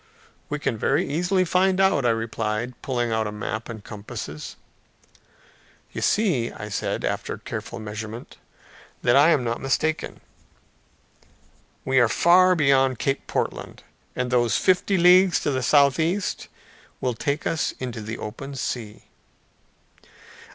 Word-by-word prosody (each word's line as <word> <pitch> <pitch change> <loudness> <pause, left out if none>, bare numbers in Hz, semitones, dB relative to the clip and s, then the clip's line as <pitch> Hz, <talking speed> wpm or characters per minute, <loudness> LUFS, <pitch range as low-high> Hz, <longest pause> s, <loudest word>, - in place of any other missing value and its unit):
"We 150 - -2
can 115 -6 -2
very - - +1
easily 180 +5 +1
find 185 +2 +2
out," 190 -10 +3
I - - +4
replied, 115 +1 -2
pulling 120 -3 -1
out 110 -1 0
a - - -4
map 110 +2 -5
and 110 -3 -8
compasses. 100 -8 -8 1.4
"You - - -5
see," 175 - +1
I 105 - -8
said, 100 - -2
after - - -3
careful - - -7
measurement, 110 +2 -7 0.7
"that 120 - +4
I 145 +4 +6
am 150 -6 +3
not 120 0 -3
mistaken. 155 +4 -1 1.7
We 130 0 +3
are 120 -2 +4
far 185 +5 +5
beyond 135 -4 +3
Cape 135 +3 -2
Portland; - - -4 0.3
and 125 0 -2
those 120 -2 +2
fifty 185 +1 +2
leagues 180 +1 +6
to 145 - 0
the 130 -1 -1
southeast 155 +8 +2 0.5
will 125 - -1
take 140 +5 -2
us 160 - -1
into 125 -3 -5
the 110 +2 -5
open 135 +6 -7
sea." 115 -5 -5
130 Hz, 135 wpm, -24 LUFS, 115-165 Hz, 1.7 s, I